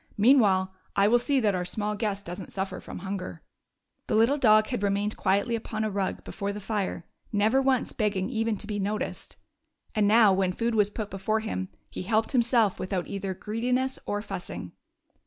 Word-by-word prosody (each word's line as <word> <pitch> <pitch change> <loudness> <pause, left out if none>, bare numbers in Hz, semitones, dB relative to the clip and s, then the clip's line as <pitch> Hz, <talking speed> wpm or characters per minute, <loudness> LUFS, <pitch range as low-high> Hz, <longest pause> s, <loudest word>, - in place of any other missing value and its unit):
Meanwhile, 205 -5 +4 0.2
I 200 0 +4
will 240 +3 +5
see 275 +2 +1
that 210 -3 +2
our 180 -1 -1
small 210 +3 -2
guest 205 -2 -2
does 175 +3 -6
n't - - -10
suffer 190 -1 -3
from - - -8
hunger.". 185 - -5 0.6
The - - 0
little 235 +7 +4
dog 215 -3 +6
had 245 -5 -2
remained 205 +1 0
quietly 200 +5 +1
upon 220 -1 -3
a 215 - -1
rug 195 -1 -2
before 200 0 -4
the 205 - -6
fire, 200 -4 -3 0.3
never 215 +5 +3
once 265 -2 +1
begging 200 -4 0
even 225 -2 -1
to 205 - -6
be 205 -1 -3
noticed; 205 +2 -3 0.6
and 210 -2 +2
now 215 -2 +6
when 190 -1 +1
food 230 +4 -1
was 210 -2 +3
put 210 0 -5
before 215 +3 -1
him 190 -4 -3 0.2
he - - -6
helped 220 +4 +1
himself 235 -5 +3
without 185 -1 -2
either 195 -1 -4
greediness 250 +6 -1
or 205 0 -2
fussing. 180 - -6
210 Hz, 190 wpm, -27 LUFS, 195-225 Hz, 0.6 s, dog